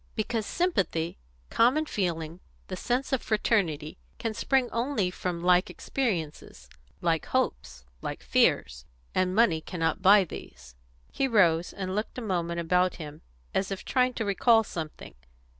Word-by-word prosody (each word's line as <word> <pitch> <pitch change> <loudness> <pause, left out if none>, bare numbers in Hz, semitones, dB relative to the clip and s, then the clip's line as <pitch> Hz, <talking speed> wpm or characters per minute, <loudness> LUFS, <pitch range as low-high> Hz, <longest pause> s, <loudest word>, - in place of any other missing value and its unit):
"Because 220 0 -2
sympathy 195 - -1 0.3
common 260 +7 +3
feeling 170 - -3 0.3
the 185 - -3
sense 250 +8 -1
of 265 - +1
fraternity 175 -9 0 0.2
can 225 -1 -3
spring 265 +3 +1
only 230 -6 0
from 175 -2 -4
like 180 +1 +4
experiences, 180 - -3 0.3
like - - 0
hopes, 65 +1 -2 0.2
like - - -5
fears. 60 +1 +1 0.3
And 185 0 +1
money 200 -8 +4
cannot 165 +1 -2
buy 200 +1 +7
these." 65 - -10 0.4
He 270 - 0
rose, 175 -8 +3
and 185 -1 -4
looked 210 +5 -3
a - - -3
moment 170 -5 -2
about 180 +2 +2
him, 150 -2 -9 0.3
as 190 0 0
if 195 0 -5
trying 255 -1 +1
to 225 - -2
recall 225 +3 +4
something. 160 -6 -7
185 Hz, 140 wpm, -28 LUFS, 165-225 Hz, 0.4 s, buy